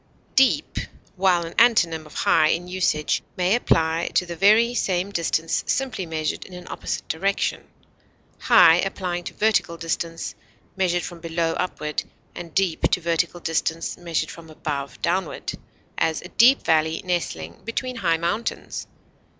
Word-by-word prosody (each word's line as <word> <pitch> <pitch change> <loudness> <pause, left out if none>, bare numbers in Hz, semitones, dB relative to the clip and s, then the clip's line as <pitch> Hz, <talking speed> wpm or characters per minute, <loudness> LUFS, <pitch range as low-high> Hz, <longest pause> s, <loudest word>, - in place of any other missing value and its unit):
Deep, 265 -1 +3 0.4
while 180 -2 +2
an 165 - -8
antonym 170 -10 +3
of 150 - -15
high 155 -1 +4
in 170 +3 0
usage, 180 -4 0 0.2
may 180 +2 +2
apply 165 -8 +2
to 180 - +3
the 170 -1 -6
very 215 +6 +5
same 190 -4 0
distance 165 -2 0
simply 250 -9 -1
measured 155 -1 -2
in 185 - -12
an 180 - -9
opposite - - -4
direction, 195 +5 -1 0.7
high 170 -9 +7
applying 180 -2 -2
to - - -6
vertical 210 -6 +1
distance 165 0 -3 0.4
measured 175 -2 +1
from 175 -1 -7
below 165 0 -1
upward, 150 -4 -2 0.3
and 170 -2 -9
deep 190 -4 +1
to - - +2
vertical 170 +1 0
distance 165 0 -1
measured 170 -2 -2
from 165 -1 -12
above 145 -3 -5
downward; 180 0 -1 0.5
as, 160 -1 +1
a 180 - -9
deep 250 +7 +5
valley 160 0 +1
nestling 85 - -3
between 250 +2 -3
high 165 -6 +2
mountains. 175 +8 -3
175 Hz, 145 wpm, -23 LUFS, 165-190 Hz, 0.7 s, high